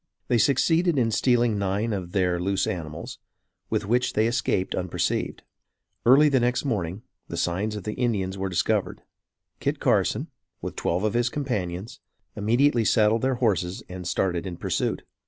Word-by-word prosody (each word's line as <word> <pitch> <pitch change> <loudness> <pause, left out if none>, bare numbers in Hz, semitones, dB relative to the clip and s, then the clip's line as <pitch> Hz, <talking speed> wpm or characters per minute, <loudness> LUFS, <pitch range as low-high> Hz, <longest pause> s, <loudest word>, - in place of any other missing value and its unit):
They 120 - +3
succeeded 160 +6 +3
in 115 -3 +2
stealing 120 -2 +2
nine 100 +3 0
of 90 -3 -4
their 90 -3 +1
loose 95 +2 0
animals, 80 -4 -5 0.5
with - - -1
which 120 +4 +1
they 110 - +2
escaped 115 -5 0
unperceived. 90 -1 -2 0.6
Early 140 +5 +7
the 135 -3 +3
next 125 +3 0
morning, 100 -5 -2 0.2
the - - -6
signs 100 +5 -1
of 105 - -6
the 105 - -3
Indians 100 -7 -1
were 95 0 -3
discovered. 90 - 0 0.6
Kit - - -1
Carson, - - +1 0.3
with - - -6
twelve 90 +4 -1
of 110 - +1
his 120 0 +2
companions, 105 -9 -3 0.4
immediately 120 +4 +3
saddled 110 +1 +3
their 130 0 +1
horses 95 -7 0
and 90 -1 -7
started 90 0 0
in 85 -2 -6
pursuit. - - -1
105 Hz, 155 wpm, -25 LUFS, 95-120 Hz, 0.6 s, Early